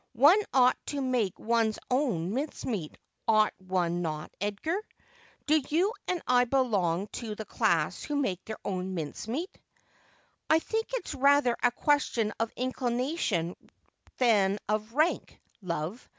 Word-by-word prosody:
One 295 - +6
ought 255 -1 +4
to 290 - -3
make 250 -8 0
one's 225 -1 +1
own 225 - +1
mincemeat, 240 - -3 0.3
ought 215 -1 +4
one 180 -2 -1
not, 155 -2 -4
Edgar? 210 - -1 0.6
Do 305 +1 +4
you 360 +8 +2
and 360 -2 -1
I 250 0 +4
belong 205 -9 +1
to 220 -2 -5
the 220 - -6
class - - +1
who 295 - -3
make 200 -11 -1
their 220 - -6
own 185 -1 -3
mincemeat 225 - -4 0.3
?' - - -33
' - - -43
I 315 - +6
think 445 +7 -2
it's - - -4
rather 280 -2 +4
a 245 - +5
question 240 -6 +1
of 225 0 0
inclination 245 - -1 0.6
than 205 -5 +3
of 215 +1 -1
rank, 310 +4 +1 0.2
love. 175 +4 -4
235 Hz, 140 wpm, -29 LUFS, 195-280 Hz, 0.6 s, One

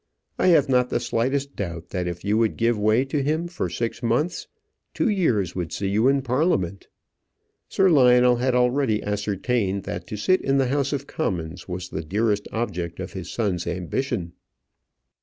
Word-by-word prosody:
I - - +3
have 160 -6 +5
not 125 -2 +2
the - - 0
slightest 135 +4 -1
doubt 85 -3 -5
that 90 -2 -2
if 85 +2 -5
you 105 +1 +2
would 115 -2 +1
give 115 +1 +2
way 110 +5 +2
to 140 +1 -1
him 155 +5 0
for 170 - -3
six 115 +7 -3
months, 125 +9 0 0.5
two - - +1
years 115 - +1
would 85 -4 -3
see 100 -1 -2
you 110 +5 +2
in 135 0 +2
Parliament." 125 - 0 0.8
Sir 190 - +3
Lionel 125 -6 +5
had 125 +1 +1
already 125 -3 +2
ascertained 105 0 -1
that 90 0 -6
to 105 - -5
sit 185 - +2
in 135 0 +1
the 135 -2 +2
House 140 0 0
of 140 -1 -2
Commons 85 - -4
was 90 0 -5
the 80 - -4
dearest 105 +4 0
object 90 -7 -3
of 95 - -6
his 95 -4 -6
son's 95 -7 -1
ambition. 90 +1 -3
115 Hz, 175 wpm, -24 LUFS, 95-135 Hz, 0.8 s, have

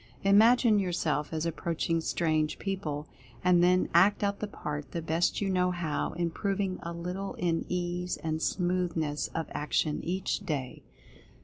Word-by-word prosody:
Imagine 220 +2 +6
yourself 170 -5 -1
as 160 0 -2
approach 165 0 -2
ing 165 -1 +1
strange 155 -2 0
people, 160 -7 -3 0.4
and 175 -1 +5
then 180 +1 +4
act 205 +2 +5
out 200 0 0
the 210 - -3
part 150 -6 -6
the 170 - -2
best 165 +5 +1
you 200 - 0
know 180 -1 +2
how, 170 -4 -2
improving 185 +3 -1
a 170 - -5
little 180 +3 -4
in 170 -2 0
ease, 180 0 -2
and 160 0 -2
smooth 180 -1 0
ness 150 -2 -1
of 165 -1 -1
action 150 0 0
each 185 +3 -1
day. 145 -10 -4
175 Hz, 155 wpm, -29 LUFS, 160-190 Hz, 0.4 s, Imagine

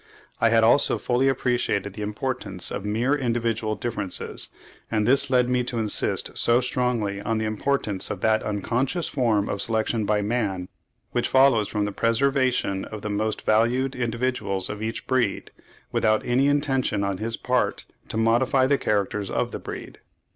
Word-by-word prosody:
I 115 - +4
had 115 0 +4
also 120 +5 +4
fully 125 +2 +1
appreciated 120 -6 0
the 105 - -7
importance 105 -3 -1
of 100 - -4
mere 115 +6 0
individual 115 -4 -1
differences, 105 -6 -3 0.4
and 105 -1 0
this 140 +2 +3
led 125 -1 +3
me 125 0 +1
to 125 -1 -3
insist 110 -2 +2
so 120 +1 +3
strongly 120 -6 -1
on 115 +2 -1
the 110 - -1
importance 110 -2 -1
of 100 - -5
that 110 0 +2
unconscious 125 - -1
form 115 -7 +1
of 100 - -2
selection 110 -1 +1
by 105 0 +1
man, 100 -5 -2 0.4
which 120 0 0
follows 130 -6 +4
from 105 -1 -1
the 105 - -3
preservation 120 -3 +1
of 110 -2 -8
the 105 - -3
most 110 +1 -2
valued 120 +5 +2
individuals 120 -5 -1
of 105 0 -7
each 110 +1 -4
breed, 125 -6 -1 0.4
without 110 -1 +1
any 130 +3 +2
intention 135 -7 +1
on 100 -1 -2
his 115 +1 -2
part 125 0 -1 0.2
to - - -5
modify 120 +4 +3
the 140 +1 +2
characters 100 -1 -1
of - - -1
the - - -5
breed. - - -8
115 Hz, 165 wpm, -24 LUFS, 105-125 Hz, 0.4 s, I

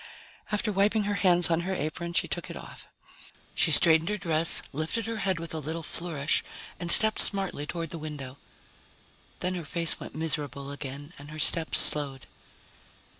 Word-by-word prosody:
After 210 +1 0
wiping 205 +2 +2
her 205 0 -1
hands 175 -3 +4
on 165 - +2
her 190 +2 -3
apron, 170 +3 -4
she - - +1
took - - -3
it - - -7
off. - - -11 0.7
She - - +2
straightened 160 0 +5
her 210 - -1
dress, 165 -3 +2
lifted 160 +10 -2
her 225 0 -4
head 190 -4 -1
with 165 0 -7
a 160 - -3
little 160 +3 -5
flourish, 155 -3 -1 0.4
and 175 -1 -4
stepped 220 +3 +6
smartly 190 -7 0
toward 165 -2 -5
the 165 - -5
window. 145 -4 -8 1.0
Then 180 +1 -1
her 175 -2 -4
face 165 +2 +2
went - - -9
miserable 145 -3 -3
again 145 +2 -8
and 145 +1 -11
her 155 - -9
steps 160 +1 +3
slowed. 140 -3 0
165 Hz, 175 wpm, -27 LUFS, 150-185 Hz, 1.0 s, stepped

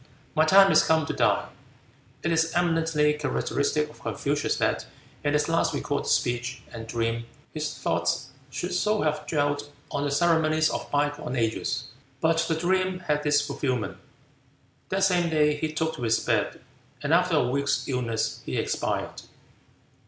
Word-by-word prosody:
My 155 0 +4
time 195 +4 +7
is - - +6
come 160 -1 +2
to - - -3
die." - - +1 0.7
It 170 - 0
is 165 0 +2
eminently 165 -3 +2
characteristic 150 0 0
of 150 - -16
Confucius 145 +1 -1
that - - 0 0.4
in 145 0 +1
his 150 0 +2
last 165 0 +1
recorded 145 -1 -2
speech 120 +1 0
and 115 0 -7
dream, 115 0 -2 0.3
his 150 -1 -2
thoughts 85 +10 -1 0.2
should 160 +7 -4
so 210 +4 +1
have 150 -1 -1
dwelt 145 -1 0 0.2
on 145 - -1
the 145 - 0
ceremonies 155 0 +3
of - - -4
bygone 145 -2 -1
ages. 115 -2 -1 0.4
But 165 0 +2
the 160 - +1
dream 185 +2 +1
had 150 -4 0
its 145 0 +4
fulfilment. 130 -5 -2 0.9
That 190 +1 0
same 180 -3 +3
day 150 -2 +3
he 155 +1 -2
took 160 +1 -2
to - - -8
his 115 -1 +2
bed, - - 0 0.4
and 145 +2 +1
after 180 0 +3
a 125 -5 +3
week's 140 +2 0
illness 120 -4 -1
he - - -3
expired. - - -2
150 Hz, 160 wpm, -26 LUFS, 140-165 Hz, 0.9 s, time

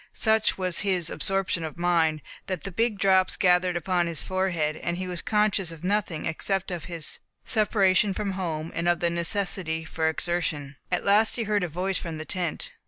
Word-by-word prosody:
Such 220 -1 +3
was 185 -2 0
his 185 -5 +2
absorption 190 0 +1
of 160 0 -6
mind, 165 -3 +1 0.2
that 185 -5 -3
the 195 - -5
big 225 +2 0
drops 190 -1 +3
gathered 180 -1 +3
upon 175 0 0
his 165 -3 -2
forehead, 175 -5 -1
and 170 0 -3
he 185 - -3
was 180 -2 -4
conscious 210 -4 +1
of 165 -1 -11
nothing 195 -4 -1
except 185 +4 -1
of 170 -4 -5
his 170 -3 -4 0.3
separation 205 -2 +3
from 205 -2 -2
home, 165 -4 -3
and 170 +1 0
of 175 -1 +2
the 170 0 +1
necessity 170 -2 0
for 160 -1 0
exertion. 160 -4 -2 0.2
At 180 - 0
last 210 +2 +4
he 235 - -1
heard 210 -2 0
a - - 0
voice 185 +4 -1
from 165 -3 -6
the 155 - -6
tent. 175 -1 -3
180 Hz, 190 wpm, -26 LUFS, 165-195 Hz, 0.3 s, last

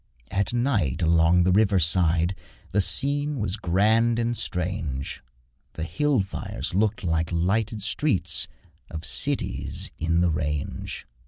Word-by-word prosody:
At 100 +1 0
night 120 - 0
along 85 +2 +4
the 90 - +3
river 100 0 +4
side 85 0 +3 0.4
The 100 - +3
scene 145 +7 +1
was 105 -4 -1
grand 110 +5 +2
and 120 0 0
strange 85 - -3 0.5
The 80 - -5
hill 130 - +1
fires 95 -2 -4
looked 105 +2 +1
like 80 -1 0
lighted 100 +5 0
streets 110 +1 0 0.4
Of 80 0 -6
cities - - -1
in 85 +1 +1
the 90 -1 +3
range. 75 -1 -3
95 Hz, 130 wpm, -25 LUFS, 85-110 Hz, 0.5 s, along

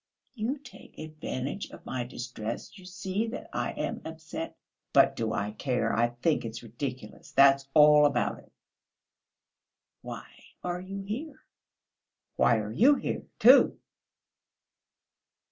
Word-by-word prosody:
"You 245 +4 -2
take 270 -3 -15
advantage 155 +2 -5
of - - -13
my 130 -2 -3
distress; 120 - -6
you 190 -3 -13
see 190 +4 -3
that 230 - -6
I - - -2
am - - -3
upset...." 160 0 -7 0.4
"But - - +5
do 110 -1 -2
I 105 0 -2
care? 120 0 -1
I 120 +1 +3 0.2
think 165 -3 +2
it's 115 +1 -6
ridiculous, 120 0 -7
that's 140 0 +5
all 150 0 +8
about 145 - -1
it!" - - -20 1.5
"Why - - -7 0.4
are 180 0 -3
you 195 +1 -6
here?" 245 +11 -6 0.9
"Why 115 - +4
are 105 -1 -3
you 260 - +5
here, - - -4
too?..." - - +7
150 Hz, 130 wpm, -29 LUFS, 120-190 Hz, 1.5 s, all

